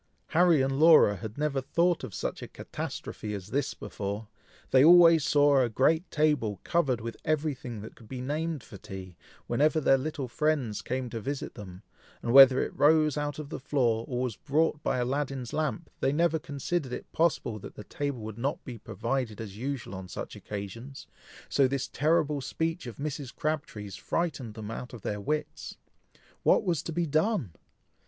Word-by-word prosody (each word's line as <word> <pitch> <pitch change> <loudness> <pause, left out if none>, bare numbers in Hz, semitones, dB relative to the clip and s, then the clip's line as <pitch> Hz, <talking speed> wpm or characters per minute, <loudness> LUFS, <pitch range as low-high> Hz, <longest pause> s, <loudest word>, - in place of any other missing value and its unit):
Harry 165 -3 +4
and 135 +1 -1
Laura 155 -10 +7
had 110 +5 -7
never 145 -2 0
thought 170 +6 +1
of - - -5
such - - -4
a - - -6
catastrophe 105 -1 -6
as 100 0 -8
this 140 +3 -1
before; 100 +2 -5 0.4
they 130 0 +6
always 165 -1 +8
saw 145 -1 +4
a 120 - +1
great 160 - +2
table 145 - +1
covered 140 -8 +1
with 115 +1 -5
every 155 -1 0
thing 120 -4 -7
that 110 - -10
could 115 - -16
be 130 +1 -6
named 150 +2 -2
for 100 - -11
tea, 95 -2 -9 0.3
whenever 150 +6 +2
their 135 -2 +4
little 140 -1 -3
friends 135 -4 0
came 130 0 -3
to 115 -1 -5
visit 140 +4 -4
them, 95 -1 -10 0.4
and 120 - 0
whether 135 -1 +9
it - - -6
rose 155 0 +4
out 145 -1 -2
of 150 -2 -7
the - - -5
floor, 120 -5 +1
or 125 -1 -2
was 125 -5 -2
brought 155 +1 0
by - - 0
Aladdin's 130 -1 -2
lamp, 155 +1 -2
they 135 - +2
never 165 +2 +2
considered 140 -1 -3
it - - -7
possible 150 -9 0
that - - -10
the 105 - -8
table 140 -2 -4
would 110 +1 -7
not 140 +5 -2
be 120 -4 -7
provided 120 0 -3
as 105 -3 -7
usual 130 -1 -4
on 95 -1 -7
such - - -7
occasions, 110 +7 -7 0.4
so 135 -2 +3
this 135 0 -2
terrible 150 0 +1
speech 160 +3 -2
of 120 - -7
Mrs. 140 -2 -5
Crabtree's 140 -10 -3
frightened 140 -10 -2
them 110 -1 -6
out 125 +2 -7
of 110 - -12
their 105 0 -3
wits. 150 +8 -3 0.6
What - - +4
was 175 -7 0
to - - -5
be 170 +1 0
done! 155 - +1
135 Hz, 185 wpm, -29 LUFS, 115-155 Hz, 0.6 s, whether